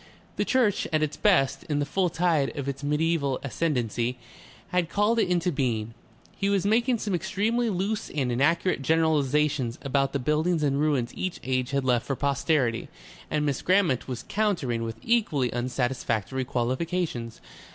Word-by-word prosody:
The -, -, 0 dB
church 245 Hz, -6 st, +2 dB
at 155 Hz, -1 st, +2 dB
its 155 Hz, -, -2 dB
best, 180 Hz, -10 st, +2 dB
in 150 Hz, -, -1 dB
the 145 Hz, -, +1 dB
full 180 Hz, +5 st, 0 dB
tide 165 Hz, -5 st, +1 dB
of 140 Hz, -1 st, -3 dB
its 140 Hz, 0 st, -4 dB
mediaeval 150 Hz, -2 st, +1 dB
ascendancy, 125 Hz, -5 st, -1 dB, 0.5 s
had 180 Hz, -2 st, 0 dB
called 210 Hz, +5 st, +2 dB
it 220 Hz, -, +2 dB
into 180 Hz, 0 st, +1 dB
being. 115 Hz, -6 st, -1 dB, 0.4 s
He 200 Hz, -, 0 dB
was 200 Hz, -1 st, +1 dB
making 235 Hz, +4 st, +3 dB
some 210 Hz, -2 st, -3 dB
extremely 215 Hz, +6 st, 0 dB
loose 205 Hz, +3 st, -2 dB
and 135 Hz, -4 st, -1 dB
inaccurate 155 Hz, +6 st, +1 dB
generalizations 150 Hz, -4 st, +1 dB
about 135 Hz, 0 st, +1 dB
the 140 Hz, -, 0 dB
buildings 155 Hz, +4 st, +1 dB
and 140 Hz, -1 st, +1 dB
ruins 140 Hz, -6 st, +1 dB
each 185 Hz, -2 st, -4 dB
age 130 Hz, -1 st, -1 dB
had 140 Hz, -1 st, -1 dB
left 125 Hz, -2 st, +1 dB
for 135 Hz, -, -1 dB
posterity, 140 Hz, -3 st, 0 dB, 0.4 s
and 150 Hz, -1 st, 0 dB
Miss 140 Hz, -2 st, -1 dB
Grammont 180 Hz, -9 st, +2 dB
was 125 Hz, -2 st, -5 dB
countering 175 Hz, -, 0 dB
with 115 Hz, 0 st, -4 dB
equally 170 Hz, -, +1 dB
unsatisfactory 125 Hz, -1 st, -1 dB
qualifications. 125 Hz, 0 st, -2 dB
145 Hz, 160 wpm, -26 LUFS, 130-180 Hz, 0.5 s, making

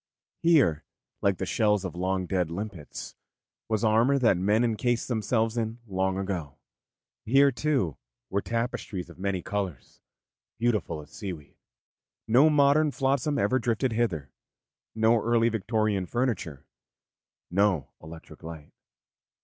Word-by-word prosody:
Here, 140 Hz, -, +4 dB, 0.4 s
like 100 Hz, -2 st, +2 dB
the 95 Hz, -, -2 dB
shells 105 Hz, -1 st, +1 dB
of 90 Hz, -, -5 dB
long 95 Hz, +1 st, -1 dB
dead 90 Hz, -3 st, 0 dB
limpets, 90 Hz, -3 st, -6 dB, 0.6 s
was 110 Hz, 0 st, 0 dB
armour 115 Hz, +5 st, +4 dB
that 120 Hz, -7 st, +4 dB
men 105 Hz, +6 st, +2 dB
encased 120 Hz, +1 st, 0 dB
themselves 115 Hz, 0 st, 0 dB
in 115 Hz, 0 st, -2 dB
long 95 Hz, -2 st, -1 dB
ago; 95 Hz, -7 st, -4 dB, 0.7 s
here, 140 Hz, +4 st, +5 dB
too, 130 Hz, -, 0 dB, 0.3 s
were 100 Hz, -, +1 dB
tapestries 115 Hz, -6 st, -3 dB
of 85 Hz, -, -16 dB
many 95 Hz, -2 st, -2 dB
colours, 95 Hz, -10 st, -5 dB, 0.6 s
beautiful 105 Hz, -9 st, 0 dB
as 75 Hz, -, -19 dB
seaweed; 90 Hz, -9 st, -7 dB, 0.7 s
no 130 Hz, +8 st, +6 dB
modern 150 Hz, +1 st, +4 dB
flotsam 140 Hz, +1 st, 0 dB
ever 130 Hz, +5 st, +2 dB
drifted 120 Hz, +1 st, 0 dB
hither, 85 Hz, -, -1 dB, 0.6 s
no 110 Hz, +1 st, +3 dB
early 115 Hz, 0 st, +3 dB
Victorian 110 Hz, -3 st, 0 dB
furniture, 110 Hz, -, -2 dB, 0.9 s
no 95 Hz, -6 st, +1 dB
electric 80 Hz, +1 st, -12 dB
light. 80 Hz, -2 st, -9 dB
105 Hz, 125 wpm, -27 LUFS, 90-120 Hz, 0.9 s, no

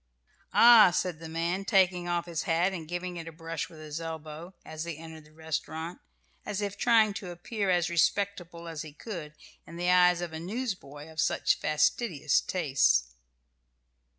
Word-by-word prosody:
"Ah!" 230 Hz, -4 st, +9 dB
said 175 Hz, -2 st, -2 dB
the 165 Hz, -1 st, -8 dB
man, 170 Hz, +4 st, -1 dB
taking 185 Hz, -3 st, +2 dB
off 175 Hz, -1 st, -1 dB
his 170 Hz, -3 st, -3 dB
hat, 175 Hz, +4 st, +2 dB
and 165 Hz, -4 st, -6 dB
giving 175 Hz, +1 st, -4 dB
it 165 Hz, -1 st, -7 dB
a -, -, -6 dB
brush 165 Hz, 0 st, -5 dB
with 160 Hz, -, -14 dB
his 155 Hz, +1 st, -6 dB
elbow, 160 Hz, +2 st, -7 dB
as 155 Hz, 0 st, -6 dB
they 170 Hz, -3 st, -5 dB
entered 160 Hz, -1 st, -11 dB
the 155 Hz, -, -20 dB
restaurant, 160 Hz, +1 st, -5 dB, 0.4 s
as 205 Hz, -1 st, -4 dB
if 205 Hz, -1 st, -3 dB
trying 225 Hz, -3 st, +4 dB
to 195 Hz, -2 st, -6 dB
appear 195 Hz, +4 st, -3 dB
as 175 Hz, -1 st, +2 dB
respectable 170 Hz, 0 st, 0 dB
as 160 Hz, -3 st, -5 dB
he 155 Hz, -2 st, -9 dB
could 155 Hz, -4 st, -7 dB, 0.3 s
in 165 Hz, -, -10 dB
the 175 Hz, +1 st, +1 dB
eyes 180 Hz, -1 st, +5 dB
of 175 Hz, -2 st, -5 dB
a 160 Hz, -, -5 dB
newsboy 180 Hz, -, -5 dB
of 160 Hz, 0 st, -3 dB
such -, -, +1 dB
fastidious 155 Hz, -, +1 dB
tastes. 60 Hz, -, +1 dB
170 Hz, 175 wpm, -29 LUFS, 160-185 Hz, 0.4 s, Ah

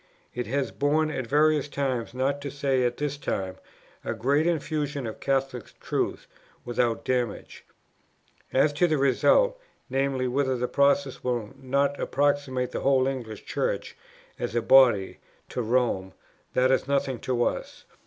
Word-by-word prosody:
It 125 Hz, 0 st, -4 dB
has 135 Hz, +3 st, -1 dB
borne 155 Hz, +2 st, +1 dB
at 130 Hz, -5 st, -4 dB
various 150 Hz, +1 st, +3 dB
times, 130 Hz, -5 st, -2 dB
not 140 Hz, +2 st, 0 dB
to 140 Hz, -, -4 dB
say 135 Hz, -2 st, 0 dB
at 120 Hz, 0 st, -1 dB
this 145 Hz, -1 st, -2 dB
time, 95 Hz, -9 st, -3 dB, 0.5 s
a 115 Hz, -, -3 dB
great 140 Hz, +8 st, +2 dB
infusion 150 Hz, -4 st, -1 dB
of 110 Hz, -, -6 dB
Catholic 135 Hz, -3 st, -2 dB
truth -, -, -2 dB, 0.4 s
without 120 Hz, -1 st, 0 dB
damage. 125 Hz, -4 st, -2 dB, 0.9 s
As 145 Hz, +3 st, +3 dB
to 175 Hz, +5 st, +3 dB
the 155 Hz, -2 st, +1 dB
result, -, -, +3 dB, 0.3 s
viz. 135 Hz, -1 st, 0 dB
whether 130 Hz, 0 st, 0 dB
this 125 Hz, +1 st, -2 dB
process 140 Hz, -1 st, +2 dB
will 120 Hz, -4 st, -2 dB
not 140 Hz, +1 st, 0 dB
approximate 140 Hz, -3 st, 0 dB
the -, -, -3 dB
whole 135 Hz, -1 st, +3 dB
English 120 Hz, -6 st, -4 dB
Church, -, -, -2 dB, 0.4 s
as -, -, -3 dB
a 120 Hz, -, +2 dB
body, 120 Hz, -6 st, +5 dB, 0.3 s
to 125 Hz, -, -3 dB
Rome, 115 Hz, -5 st, 0 dB, 0.4 s
that 130 Hz, +1 st, +4 dB
is 130 Hz, -, +1 dB
nothing 135 Hz, -3 st, 0 dB
to 125 Hz, -2 st, 0 dB
us. -, -, -3 dB
135 Hz, 150 wpm, -26 LUFS, 125-140 Hz, 0.9 s, body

